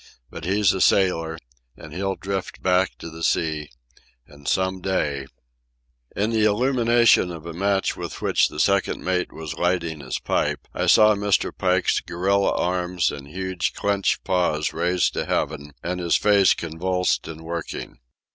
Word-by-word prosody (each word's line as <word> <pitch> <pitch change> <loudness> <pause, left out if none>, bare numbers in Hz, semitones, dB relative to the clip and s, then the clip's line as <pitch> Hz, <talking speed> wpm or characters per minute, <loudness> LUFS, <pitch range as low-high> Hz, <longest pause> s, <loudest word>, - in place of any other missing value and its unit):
But - - -8
he's 100 +1 +3
a 95 - -2
sailor, 80 -4 +2 0.4
and 75 -2 -11
he'll 95 +2 -2
drift 95 -1 -5
back 90 0 +2
to 85 - -8
the 80 +1 -10
sea, 80 -2 0 0.6
and 70 0 -15
some 95 0 0
day... 75 -8 -1 0.4
" - - -38
In 105 +3 0
the 110 -1 +2
illumination 120 -2 +3
of 85 -2 -8
a 85 - -6
match 95 +2 0
with - - -6
which - - +2
the - - -8
second - - +1
mate 90 -1 -1
was 80 -2 -6
lighting 85 -3 -1
his 65 -3 -4
pipe - - -1
I - - -1
saw 110 0 +6
Mr. 105 -1 0
Pike's 90 -1 +1
gorilla 100 +3 0
arms 90 -1 0
and 70 -1 -8
huge 95 +1 -3
clenched 100 -1 0
paws 90 -5 0
raised 90 +2 +1
to - - -2
heaven, 75 -1 -2
and 90 +1 -3
his 85 -1 +1
face 100 -3 +4
convulsed 90 +3 -1
and 80 -1 -8
working. 80 -5 -6
90 Hz, 160 wpm, -23 LUFS, 80-95 Hz, 0.6 s, saw